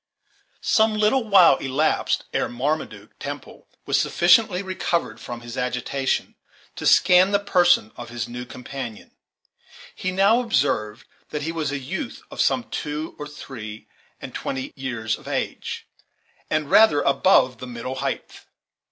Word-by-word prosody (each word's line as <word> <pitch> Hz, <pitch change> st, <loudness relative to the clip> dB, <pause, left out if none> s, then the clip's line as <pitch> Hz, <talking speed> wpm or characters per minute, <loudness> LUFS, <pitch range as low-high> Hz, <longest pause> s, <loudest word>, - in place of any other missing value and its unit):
Some 220 Hz, 0 st, +3 dB
little 215 Hz, +5 st, +3 dB
while 185 Hz, -9 st, +6 dB
elapsed 140 Hz, +4 st, 0 dB
ere -, -, 0 dB
Marmaduke 140 Hz, +6 st, -3 dB
Temple -, -, -8 dB, 0.2 s
was -, -, +2 dB
sufficiently 200 Hz, -5 st, +3 dB
recovered 185 Hz, -2 st, -2 dB
from 120 Hz, -1 st, -7 dB
his 120 Hz, 0 st, -8 dB
agitation 125 Hz, +2 st, -1 dB, 0.4 s
to -, -, -1 dB
scan 180 Hz, +1 st, +6 dB
the 200 Hz, -, +3 dB
person 175 Hz, -, +3 dB
of 120 Hz, -, -8 dB
his 120 Hz, -1 st, -4 dB
new 120 Hz, +1 st, -6 dB
companion. 125 Hz, -2 st, -8 dB, 0.8 s
He 185 Hz, -, -3 dB
now 200 Hz, +6 st, +4 dB
observed 125 Hz, -, 0 dB, 0.2 s
that 150 Hz, -1 st, -4 dB
he 165 Hz, -, -2 dB
was 160 Hz, -4 st, -2 dB
a 145 Hz, -, -2 dB
youth 175 Hz, -, -5 dB
of -, -, -2 dB
some 255 Hz, -, +2 dB
two 150 Hz, +2 st, -4 dB
or 150 Hz, -, -5 dB
three 115 Hz, -7 st, -9 dB, 0.3 s
and -, -, -9 dB
twenty 130 Hz, -1 st, -4 dB
years 115 Hz, -5 st, -3 dB
of -, -, -15 dB
age, -, -, -4 dB, 0.6 s
and 155 Hz, -2 st, -1 dB
rather 215 Hz, -10 st, +6 dB
above 135 Hz, -, +3 dB
the 125 Hz, -, -7 dB
middle 120 Hz, +1 st, -5 dB
height. 140 Hz, -, -5 dB
145 Hz, 145 wpm, -23 LUFS, 125-185 Hz, 0.8 s, while